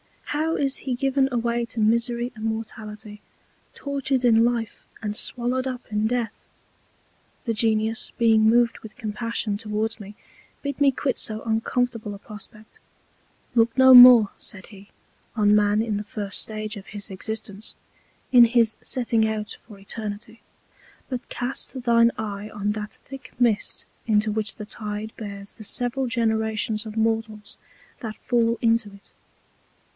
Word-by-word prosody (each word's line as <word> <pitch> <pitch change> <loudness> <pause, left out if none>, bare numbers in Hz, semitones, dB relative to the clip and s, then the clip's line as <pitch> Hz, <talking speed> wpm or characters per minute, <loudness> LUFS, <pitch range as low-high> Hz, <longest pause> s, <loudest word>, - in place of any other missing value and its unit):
How 315 +2 -1
is 275 -1 0
he 255 -2 -3
given 270 +1 +1
away 235 0 0
to 235 - -6
Misery 235 +2 +1
and 220 0 -6
Mortality! 215 -1 -6 0.5
tortured 275 -2 -1
in 225 -1 +5
Life, 235 -3 -2 0.2
and 210 -1 -3
swallowed 250 +3 0
up 255 -1 -5
in 210 +1 +1
Death! 235 -2 -3 1.0
The 230 - -1
Genius 220 0 0
being 225 -2 +4
moved 235 +2 +3
with 220 - -12
Compassion 220 -2 -3
towards 220 +1 -2
me, 205 0 -10 0.5
bid 285 0 -4
me 280 -1 +6
quit 265 0 -2
so 215 0 -3
uncomfortable 230 -1 -1
a - - -12
Prospect: 215 +1 -12 0.7
Look 230 +1 +2
no 260 0 +8
more, 245 -4 +10
said 190 -3 -3
he, 200 -1 -15 0.5
on 210 -2 +4
Man 210 0 +3
in 215 -3 -2
the 205 - -4
first 205 -1 -3
Stage 215 0 -5
of 195 - -11
his 205 -1 -6
Existence, 210 +1 -5 0.6
in 245 -2 +9
his 230 -1 +2
setting 230 -3 +1
out 215 -1 -4
for 210 -3 -12
Eternity; 215 +3 -7 0.7
but 255 -2 -5
cast 255 +1 -4
thine 235 -1 +5
Eye 210 -1 -5
on 210 -1 -2
that 210 0 -5
thick 270 -1 -11
Mist 235 -3 0 0.2
into 215 -1 +2
which 215 -1 -3
the 210 - -7
Tide 210 0 -5
bears 200 -2 -7
the 220 - -12
several 250 +4 0
Generations 220 -2 0
of 215 +1 -8
Mortals 220 -1 -1 0.4
that 220 -2 -6
fall 235 -1 +1
into 230 -2 +2
it. 200 0 -17
225 Hz, 150 wpm, -24 LUFS, 210-240 Hz, 1.0 s, more